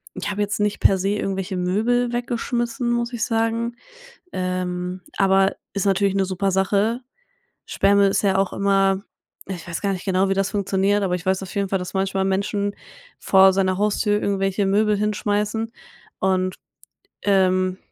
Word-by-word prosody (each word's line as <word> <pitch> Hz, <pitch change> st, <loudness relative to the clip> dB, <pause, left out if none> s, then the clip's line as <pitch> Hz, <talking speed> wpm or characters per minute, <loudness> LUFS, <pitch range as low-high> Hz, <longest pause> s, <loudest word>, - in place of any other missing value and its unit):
ich -, -, -4 dB
habe 205 Hz, +1 st, -2 dB
jetzt 205 Hz, +1 st, -1 dB
nicht 210 Hz, 0 st, 0 dB
per 195 Hz, -, +5 dB
se 195 Hz, +2 st, 0 dB
irgendwelche 195 Hz, -2 st, -2 dB
Möbel 230 Hz, +7 st, +1 dB
weggeschmissen, 240 Hz, 0 st, -2 dB
muss 240 Hz, 0 st, -1 dB
ich 235 Hz, -1 st, -1 dB
sagen. 230 Hz, 0 st, -1 dB, 0.6 s
Ähm, 180 Hz, 0 st, -3 dB, 0.2 s
aber 195 Hz, 0 st, +3 dB, 0.2 s
ist 200 Hz, -1 st, -2 dB
natürlich 195 Hz, 0 st, +2 dB
‘ne 195 Hz, -1 st, +2 dB
super 190 Hz, +1 st, -1 dB
Sache. 200 Hz, +5 st, +1 dB, 0.7 s
Sperrmüll 200 Hz, 0 st, +3 dB
ist 195 Hz, -, +1 dB
ja 195 Hz, -2 st, +2 dB
auch 195 Hz, -1 st, +1 dB
immer 195 Hz, -1 st, +2 dB, 0.5 s
ich 175 Hz, -4 st, -6 dB
weiß 170 Hz, -, -4 dB
gar 200 Hz, -1 st, +1 dB
nicht 185 Hz, -2 st, -5 dB
genau, 190 Hz, 0 st, +2 dB
wie -, -, +2 dB
das 195 Hz, 0 st, 0 dB
funktioniert, 200 Hz, 0 st, +1 dB
aber 185 Hz, -2 st, 0 dB
ich 180 Hz, -, -10 dB
weiß 190 Hz, 0 st, +1 dB
auf 190 Hz, -, -8 dB
jeden 200 Hz, -1 st, -1 dB
Fall, 195 Hz, -, 0 dB
dass 180 Hz, -1 st, -6 dB
manchmal 190 Hz, 0 st, 0 dB
Menschen 200 Hz, +1 st, -1 dB, 0.4 s
vor 190 Hz, 0 st, +5 dB
seiner 185 Hz, -1 st, +1 dB
Haustür 210 Hz, 0 st, +1 dB
irgendwelche 195 Hz, 0 st, 0 dB
Möbel 210 Hz, +2 st, +2 dB
hinschmeißen 210 Hz, +1 st, -1 dB, 0.5 s
und, 185 Hz, -1 st, +1 dB, 0.7 s
ähm, 185 Hz, -2 st, +2 dB
195 Hz, 165 wpm, -22 LUFS, 190-210 Hz, 0.7 s, per